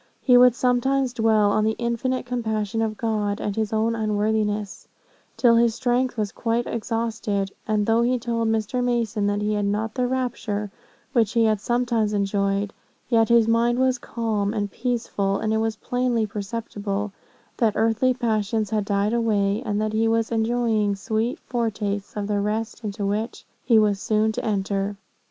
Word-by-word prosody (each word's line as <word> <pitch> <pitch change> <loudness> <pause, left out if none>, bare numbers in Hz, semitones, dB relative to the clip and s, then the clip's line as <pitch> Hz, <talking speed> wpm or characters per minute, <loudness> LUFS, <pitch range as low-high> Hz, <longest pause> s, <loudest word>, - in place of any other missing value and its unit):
He 250 - +5
would 250 -1 +7
sometimes 255 +1 +1
dwell 220 -3 +3
on 215 +1 +2
the 220 0 +1
infinite 240 +2 -1
compassion 225 -3 -2
of 215 -1 -1
God, 210 -3 -1
and 205 - -3
his 220 -2 -1
own 220 +1 +1
unworthiness, 210 -1 -1 0.5
till 235 -2 +5
his 230 -1 +3
strength 245 0 0
was 210 -2 -1
quite 235 +1 -1
exhausted; 220 -3 -2 0.2
and 210 -1 +1
though 225 +2 +3
he 250 +2 +2
told 230 -1 -1
Mr. 225 +3 0
Mason 230 -4 0
that 205 0 0
he 210 0 0
had 205 -1 0
not 210 +2 -1
the 250 -1 0
rapture 225 -5 -2 0.4
which 225 -4 +2
he 230 -2 +3
had 215 -2 +1
sometimes 235 -3 0
enjoyed, 200 0 0 0.4
yet 225 -2 +3
his 235 -1 +5
mind 235 +1 +2
was 260 -1 +2
calm 215 -4 -2
and 205 -1 -2
peaceful; 225 -5 -1
and 220 0 -1
it - - +2
was 225 0 -1
plainly 245 -1 0
perceptible, 205 -1 -4 0.5
that 225 -3 +2
earthly 225 +3 +2
passions 220 -3 -1
had 210 -2 0
died 205 +2 +1
way, 210 -3 +1
and 205 0 -1
that 215 0 -1
he 225 +1 +2
was 225 0 +1
enjoying 225 -2 +1
sweet 220 +4 -1
foretastes 210 -4 -3
of 205 - -2
that 205 0 0
rest 220 +3 -3
into 205 -1 -3
which 210 +4 -3 0.2
he 230 -3 +4
was 210 -2 +3
so 215 - -1
soon 215 +1 +3
to - - -4
enter. 200 -1 -1
220 Hz, 175 wpm, -24 LUFS, 205-235 Hz, 0.5 s, would